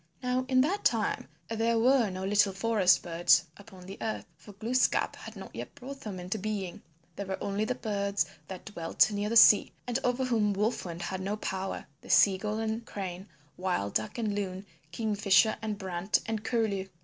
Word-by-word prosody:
Now 250 +1 0
in 255 -1 +5
that 370 +9 0
time - - +1 0.2
there 230 +1 +1
were 245 -1 +4
no 185 0 -5
little 205 0 +3
forest 190 -3 +3
birds 175 0 +4
upon 195 -3 -14
the 195 +2 -9
earth, 220 - -3
for 170 +6 -14
Glooskap 235 +6 +1
had - - -10
not - - -10
yet - - -7
brought 275 0 -8
them 200 -4 -6
into 180 +4 -4
being. 200 -3 -4 0.3
There 200 - -5
were 190 - -2
only 200 +2 -1
the 250 - -1
birds 200 -4 -1 0.2
that 185 -2 -8
dwelt 175 0 +1
near 205 0 -2
the 230 - +3
sea 210 -2 +7
and 245 +1 -1
over 250 +1 +1
whom 220 -5 +2
Wolf 210 +3 -1
Wind 170 0 -6
had 190 +1 -4
no 200 +3 -2
power 190 -2 -4 0.2
Sea 190 -2 +5
gull 210 +1 -2
and 220 +1 -2
Crane, 190 -3 -6 0.3
Wild 180 - -1
duck 110 0 -1
and 220 -3 -1
Loon, 195 -1 -4 0.3
Kingfisher 210 +1 +3
and 215 -2 -3
Brant 190 -1 -1
and 220 -1 -3
Curlew. 220 -5 0
205 Hz, 185 wpm, -29 LUFS, 190-225 Hz, 0.3 s, sea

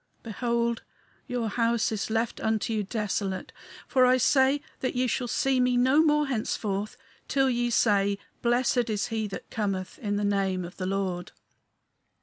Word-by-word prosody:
Behold, 235 +1 -1 0.5
your 245 -3 -2
house 230 +1 +1
is 215 -1 -2
left 225 +1 -1
unto 220 0 0
you 215 - 0
desolate, 200 -2 -3 0.4
for 255 - +3
I 255 0 +5
say 270 +2 +3 0.2
that 255 - -2
ye 250 +1 +2
shall 250 +1 -1
see 265 +2 +1
me 250 0 +3
no 260 +5 +5
more 300 -1 +3
henceforth 215 -5 -2 0.3
till 270 -1 +2
ye 240 0 0
say, 200 -3 +2 0.2
Blessed 240 0 +2
is 210 0 -1
he 220 -2 -2
that 195 - -8
cometh 195 -4 -3
in 205 -1 -2
the 205 0 0
name 195 -3 0
of 175 - -11
the 185 - -3
Lord." 190 -2 -2
225 Hz, 160 wpm, -27 LUFS, 200-250 Hz, 0.5 s, I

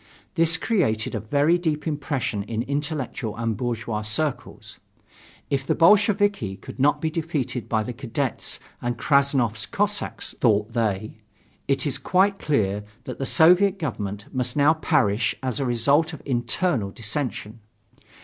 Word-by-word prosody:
This 165 -1 +3
created 130 - 0
a 110 - -1
very 145 - +2
deep 155 -3 -1
impression 145 -8 -2
in 110 +2 -3
intellectual 140 -5 -3
and 115 -1 -1
bourgeois 115 -2 -3
circles. 120 +7 -4 0.7
If 135 -1 -1
the - - +2
Bolsheviki 200 - +3
could - - -11
not 145 +2 +3
be 160 - -1
defeated 155 -7 -3
by 110 -1 +1
the 125 - -5
cadets 130 +1 -3 0.2
and 120 0 -2
Krassnov's 135 -6 +2
Cossacks, 205 0 -2
thought 105 -1 +2
they, 110 -2 -2 0.5
it 135 -1 +1
is 140 -2 0
quite 190 +7 +2
clear 105 -8 0 0.2
that 125 -2 -7
the 135 - -2
Soviet 180 +4 +5
government 105 - -4
must 130 +1 -2
now 145 +2 +5
perish 110 -8 +1
as 130 -1 -2
a 135 - -1
result 140 +7 +2
of - - -9
internal 120 - 0
dissension. 115 0 -4
135 Hz, 140 wpm, -24 LUFS, 110-155 Hz, 0.7 s, Soviet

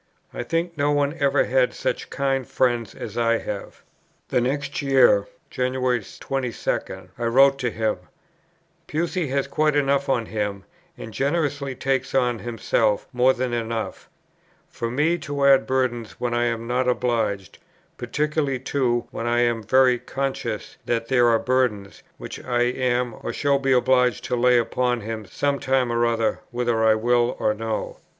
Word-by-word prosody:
I - - -4
think 165 +6 -2
no 145 -1 +1
one 145 0 +1
ever 140 -1 +3
had - - +1
such - - -3
kind 135 -2 -1
friends 120 -4 0
as - - -6
I 115 0 +3
have." 105 -2 -7 0.5
The 125 - +2
next 140 +5 -2
year, 140 - +4 0.2
January 125 -2 0 0.2
22, 130 -4 -3
I - - -3
wrote 135 +3 +5
to 125 -2 0
him: 110 -1 -1 0.9
"Pusey 170 +1 -1
has 135 +1 0
quite 155 -1 +1
enough 140 -1 +1
on 120 -4 +1
him, 105 -3 -3 0.3
and 110 - -9
generously 140 -1 -1
takes 135 +1 -1
on 125 -3 +2
himself 115 -2 0
more 125 +1 +4
than 125 -1 -2
enough, 115 -1 -4 0.6
for 115 -8 -4
me 155 +8 +1
to 145 -2 -2
add 135 -1 +5
burdens 125 -4 -1
when 120 -1 -3
I 120 0 +1
am 115 -1 -2
not 125 +2 0
obliged; 115 -6 -1 0.4
particularly 150 -2 -1
too, 125 -2 -1
when 115 - -4
I 120 0 +2
am 120 -1 +1
very 130 +2 +4
conscious, 135 +2 -4
that 115 -1 -1
there 125 -2 +4
are 115 -1 +4
burdens, 120 -6 -1 0.2
which - - -8
I 120 -1 +1
am 125 -1 0
or - - -3
shall 140 -1 +1
be 135 -1 0
obliged 125 -2 +3
to 125 - -1
lay 125 0 +4
upon 120 +1 0
him 110 -1 -6
some 140 +5 -1
time 130 -2 +1
or 120 0 +2
other, 115 -1 0
whether 120 -2 0
I 110 -1 +5
will 120 +2 +2
or 105 - +2
no." 110 0 -4
125 Hz, 160 wpm, -23 LUFS, 115-135 Hz, 0.9 s, wrote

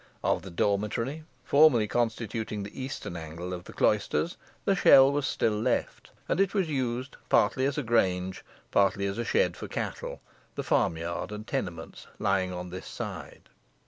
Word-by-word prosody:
Of - - +1
the 95 - -9
dormitory, 105 - -1 0.2
formerly 140 -7 +5
constituting 110 -2 -2
the 105 +6 -8
eastern 130 -8 -5
angle 85 +2 -6
of 90 0 -6
the - - -10
cloisters, 105 - +1 0.3
the 195 - +3
shell 135 -7 +7
was 145 -1 0
still 110 - +1
left, 105 - -1 0.2
and - - 0
it 195 +1 +1
was 190 -4 +2
used 130 -2 -2
partly 115 +5 +3
as 140 +1 -1
a 150 - 0
grange, 95 -5 +1 0.3
partly 100 0 +3
as 100 +3 -2
a - - 0
shed - - +2
for - - -7
cattle, - - -4 0.4
the - - -3
farm 80 - +2
yard 85 +4 -4
and 105 0 -6
tenements 90 -11 -5
lying 95 -2 +1
on 90 0 -6
this 95 +1 -7
side. - - -7
105 Hz, 170 wpm, -28 LUFS, 95-135 Hz, 0.4 s, shell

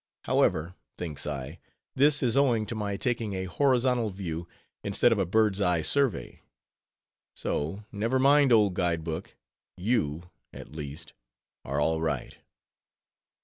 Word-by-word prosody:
However, 85 +3 +1 0.2
thinks 80 -5 -4
I, 75 +3 -5 0.3
this 145 +1 +3
is 120 -3 +2
owing 125 -6 +3
to 115 - -4
my 105 -2 -3
taking 115 -4 -1
a 95 0 -2
horizontal 125 +1 +2
view, 85 -4 -5 0.4
instead 100 +4 +3
of 110 - +2
a 95 - +1
bird's 105 0 +2
eye 90 -4 +2
survey. 140 - 0 0.9
So, 80 +9 -2
never 115 +5 0
mind 140 +1 +5
old 105 -4 +5
guide 85 -3 0
book, 80 -1 -5 0.4
you, 90 -5 -1 0.2
at - - -11
least, 75 +1 -7 0.5
are 70 +2 -2
all 80 +2 +1
right. 80 -1 -2
100 Hz, 135 wpm, -28 LUFS, 80-120 Hz, 0.9 s, mind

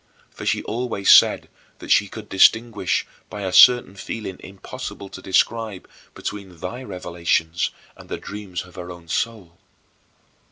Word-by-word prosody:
For - - -8
she - - +1
always 115 -4 0
said - - +6 0.3
that - - -7
she 100 - +5
could 110 +1 -9
distinguish, 110 0 +3 0.2
by 105 - -7
a 95 -1 -3
certain 120 -6 +7
feeling 95 -1 -6
impossible 95 0 -8
to 95 - -10
describe, 110 +1 0 0.3
between 100 -4 -7
thy 120 +9 -6
revelations 85 -5 -1 0.3
and - - -15
the - - -3
dreams 100 -3 -6
of 90 - -17
her 90 -1 -7
own 85 -1 -11
soul. 95 -2 -3
100 Hz, 145 wpm, -22 LUFS, 90-110 Hz, 0.3 s, certain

